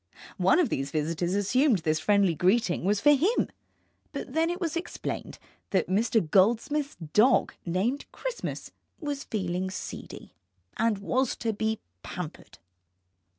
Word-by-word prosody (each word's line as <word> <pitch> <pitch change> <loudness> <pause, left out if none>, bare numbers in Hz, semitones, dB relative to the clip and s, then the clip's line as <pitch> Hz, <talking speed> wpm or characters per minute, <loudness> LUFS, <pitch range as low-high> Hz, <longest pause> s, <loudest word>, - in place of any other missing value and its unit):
One - - +5
of 355 -5 +3
these 135 +1 -2
visitors 165 +4 -1
assumed 245 +5 +3
this 155 -1 +1
friendly 200 0 +3
greeting 180 +3 +2
was 205 +1 +2
for 295 - +6
him, 335 - +2 0.6
but - - -6
then 325 +1 +2
it 350 +1 -3
was 335 -4 -2
explained 335 - -4 0.3
that 185 -3 +1
Mr. 215 -1 +2
Goldsmith's 235 - +2 0.2
dog, 245 +5 +4
named 205 +11 -1
Christmas, - - -5 0.3
was 290 -3 -4
feeling 185 -3 -2
seedy, 185 - -8 0.4
and 225 -2 +1
was 250 +6 0
to 225 -2 -2
be 220 +1 -1 0.2
pampered. - - -7
220 Hz, 135 wpm, -28 LUFS, 185-280 Hz, 0.6 s, for